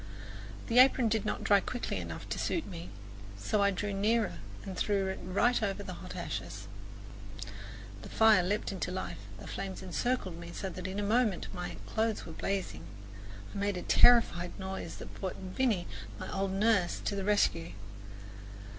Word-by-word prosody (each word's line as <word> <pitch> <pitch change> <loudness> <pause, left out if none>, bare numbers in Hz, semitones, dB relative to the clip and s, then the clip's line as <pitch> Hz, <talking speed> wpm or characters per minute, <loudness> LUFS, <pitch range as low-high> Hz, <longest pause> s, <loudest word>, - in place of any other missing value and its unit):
The 235 +1 +4
apron 255 -2 +6
did 220 0 +1
not - - -2
dry 200 -1 +6
quickly 245 +5 -3
enough - - -6
to - - -2
suit 330 - 0
me, 170 -3 -7 0.5
so 200 - +1
I 200 - +5
drew 200 +1 -2
nearer 215 +3 +1 0.3
and 190 -2 -5
threw 195 0 +1
it 190 - -4
right 215 +7 +2
over 200 -1 -1
the 185 - -6
hot - - -8
ashes. - - -5 1.3
The - - -9
fire 220 -3 +6
leaped 200 +4 -1
into 190 - -3
life; 185 +1 -4 0.2
the - - -10
flames 190 -1 -5
encircled 185 -1 -1
me 170 0 -8
so 195 - -3
that 185 +1 -5
in 190 +2 -3
a - - 0
moment 215 -2 +1
my 180 -1 -4
clothes 220 0 0
were 165 - -8
blazing. 190 - -3 0.7
I - - -5
made 200 -1 0
a 180 - -4
terrified 200 -8 +5
noise 190 0 -5
that - - -9
brought 190 -2 -4
Viny, 190 0 0 0.3
my - - -5
old 195 0 0
nurse, 200 -3 +3
to - - 0
the 195 - -2
rescue. 190 -5 +2
200 Hz, 170 wpm, -32 LUFS, 185-220 Hz, 1.3 s, apron